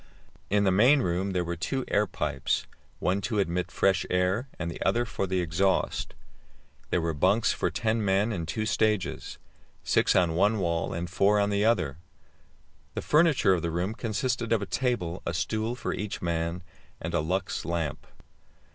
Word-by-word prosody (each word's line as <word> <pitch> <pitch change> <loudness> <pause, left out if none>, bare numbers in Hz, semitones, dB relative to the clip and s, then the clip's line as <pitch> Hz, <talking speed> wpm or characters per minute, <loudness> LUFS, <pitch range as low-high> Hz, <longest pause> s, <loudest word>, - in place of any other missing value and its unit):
In 100 +1 +3
the 95 - +3
main 125 +8 +5
room 90 +3 0
there 90 -1 +1
were 85 0 -3
two 130 - -2
air 105 0 +2
pipes, - - -1 0.3
one 95 +2 0
to 105 +2 -2
admit 90 -2 0
fresh 95 0 +2
air, 90 +7 +1
the 85 +1 -4
other 120 +5 +2
for 100 -4 -3
the 95 0 0
exhaust. 90 +3 0 0.7
There - - +1
were 85 -1 -1
bunks 95 +8 +2
for - - 0
ten 110 0 0
men 100 +3 +2
in 85 -4 -4
two 110 +5 -2
stages, 110 -2 0 0.5
six - - +2
on 85 -3 +3
one 100 +6 +3
wall 85 -4 -1
and 85 +1 -3
four 100 +3 +3
on 100 0 +1
the 100 +1 +1
other. 90 - +1 1.0
The - - -3
furniture 150 - +4
of 90 - 0
the 85 - -1
room 90 +5 -1
consisted 115 +1 -2
of 110 -3 +2
a - - -3
table, 100 -9 -1
a 85 - -3
stool 110 +7 -1
for - - -3
each 105 0 -4
man, 85 +1 -2 0.4
and - - -5
a - - +2
Lux 90 +5 -2
lamp. 80 -3 -3
95 Hz, 175 wpm, -28 LUFS, 85-110 Hz, 1.0 s, main